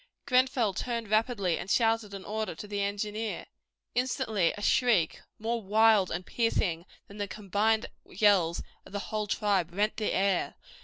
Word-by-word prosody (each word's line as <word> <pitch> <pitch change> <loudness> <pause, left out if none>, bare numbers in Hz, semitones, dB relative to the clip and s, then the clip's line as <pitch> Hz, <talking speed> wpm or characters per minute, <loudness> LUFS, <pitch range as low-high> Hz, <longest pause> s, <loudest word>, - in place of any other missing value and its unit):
Grenfell 255 -5 +2
turned 230 0 -3
rapidly 215 -6 +1
and 190 - -7
shouted 225 -2 +1
an 195 - -8
order 220 +1 -3
to 210 - -8
the 205 0 -2
engineer. 210 +2 -3 0.5
Instantly 220 -7 +1
a - - -7
shriek, 215 -11 +2 0.2
more 230 +2 -2
wild 215 -1 +4
and 180 +1 -4
piercing 185 -7 0 0.2
than 200 - -12
the 205 - -2
combined 215 +3 0 0.2
yells 190 -4 +2 0.2
of - - -16
the - - -1 0.2
whole 215 -1 -1
tribe, 200 -5 +1
rent 205 +4 0
the 215 - -1
air. 195 -1 +1
210 Hz, 155 wpm, -29 LUFS, 195-225 Hz, 0.5 s, wild